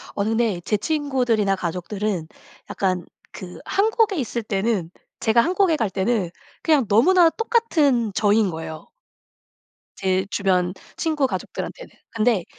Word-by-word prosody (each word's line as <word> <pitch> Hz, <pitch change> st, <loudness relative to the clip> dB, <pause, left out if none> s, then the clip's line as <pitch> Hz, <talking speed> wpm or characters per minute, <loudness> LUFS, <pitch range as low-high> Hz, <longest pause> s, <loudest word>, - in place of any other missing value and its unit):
어느 205 Hz, +2 st, 0 dB
네 225 Hz, -6 st, +1 dB
제 210 Hz, -, +1 dB
친구들이나 245 Hz, -7 st, 0 dB
가족들은 180 Hz, 0 st, -3 dB, 0.4 s
약간 185 Hz, -2 st, -1 dB, 0.3 s
그 180 Hz, -1 st, -9 dB
한국에 435 Hz, -1 st, +2 dB
있을 240 Hz, -4 st, -2 dB
때는 195 Hz, -4 st, -1 dB, 0.3 s
제가 225 Hz, +1 st, +4 dB
한국에 360 Hz, +4 st, +2 dB
갈 225 Hz, -8 st, -1 dB
때는 190 Hz, -1 st, 0 dB, 0.3 s
그냥 295 Hz, -8 st, +3 dB
너무나 330 Hz, -, +5 dB
똑같은 315 Hz, -, +1 dB
저인 210 Hz, -1 st, +3 dB
거예요 160 Hz, -1 st, -7 dB, 1.1 s
제 190 Hz, 0 st, 0 dB
주변 185 Hz, -2 st, +1 dB, 0.2 s
친구 310 Hz, -4 st, +1 dB
가족들한테는. -, -, -6 dB, 0.2 s
근데 220 Hz, -4 st, +1 dB
220 Hz, 270 characters per minute, -22 LUFS, 190-290 Hz, 1.1 s, 너무나